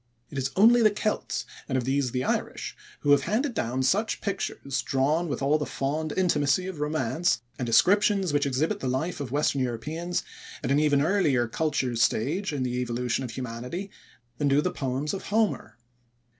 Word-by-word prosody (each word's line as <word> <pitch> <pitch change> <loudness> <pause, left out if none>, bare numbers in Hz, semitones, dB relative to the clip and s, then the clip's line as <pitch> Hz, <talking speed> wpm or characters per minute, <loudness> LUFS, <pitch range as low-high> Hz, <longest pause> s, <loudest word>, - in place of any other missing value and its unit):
It 140 - -3
is 130 0 -1
only 235 +5 +6
the 215 - +6
Celts, 215 +1 -2 0.2
and 130 - +1
of 125 - 0
these 135 +1 0
the 125 +1 -2
Irish, - - -2 0.3
who 145 - +2
have 140 -1 +5
handed 245 +5 0
down 130 - -1
such 205 +11 +1
pictures 140 -9 -3
drawn 145 +6 +1
with 140 -2 -3
all 150 +3 +3
the 150 - -2
fond 150 +3 -2
intimacy 170 -2 +2
of 185 -5 -6
romance, 150 -1 0 0.2
and 125 - -2
descriptions 195 - +4
which 145 -1 +2
exhibit 155 +10 0
the - - -3
life 135 +8 -1
of 135 -4 -5
western 145 -1 +1
Europeans 155 +9 -2 0.4
at - - -1
an 140 - +4
even 145 -2 +3
earlier 155 -9 +2
culture 135 -2 -1
stage 155 - +1
in 140 -3 -2
the 125 -1 -2
evolution 125 +1 -1
of 125 - -4
humanity 125 - -5 0.5
than 145 - +2
do 140 +1 +4
the - - 0
poems 135 +2 -2
of 195 - -5
Homer. 205 - 0
145 Hz, 185 wpm, -27 LUFS, 130-180 Hz, 0.5 s, only